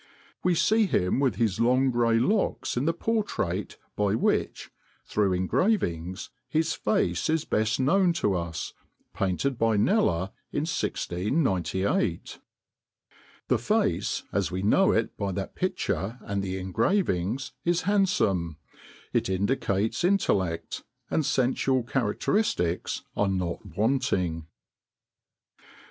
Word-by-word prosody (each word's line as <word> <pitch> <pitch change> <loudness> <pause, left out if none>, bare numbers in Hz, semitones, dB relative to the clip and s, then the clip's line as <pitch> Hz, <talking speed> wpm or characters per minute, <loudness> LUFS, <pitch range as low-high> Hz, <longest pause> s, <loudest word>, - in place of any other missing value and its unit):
We 180 -1 +3
see 220 +5 +3
him 90 - +1
with 130 -7 +2
his 110 -2 0
long 130 +3 +3
gray 120 -1 +2
locks 195 - 0
in 125 +3 0
the 165 - +3
portrait 165 - -2 0.2
by 105 0 +1
which, - - 0 0.3
through 105 -2 +1
engravings, 95 - 0 0.2
his 160 +2 +1
face 90 - 0
is 160 0 +1
best 110 +3 0
known 180 +7 +3
to 105 - 0
us, 85 -3 -3 0.4
painted 115 +7 -1
by 115 -2 +3
Kneller 100 - +2 0.2
in - - -1
1698. 95 - -1 1.1
The - - +2
face, - - 0
as - - +1
we 95 +1 -3
know 190 - +4
it 115 - 0
by 100 -2 -2
that 95 +1 -4
picture 115 - -2
and 100 0 -3
the 95 -1 -3
engravings, 110 - 0
is 175 0 +1
handsome, 145 - +1 0.6
it - - +1
indicates 100 - 0
intellect, 95 - 0 0.3
and 160 - +2
sensual 130 -1 +1
characteristics 115 - 0
are 105 - +2
not 90 -3 -2
wanting." 100 - 0
110 Hz, 115 wpm, -27 LUFS, 95-155 Hz, 1.1 s, know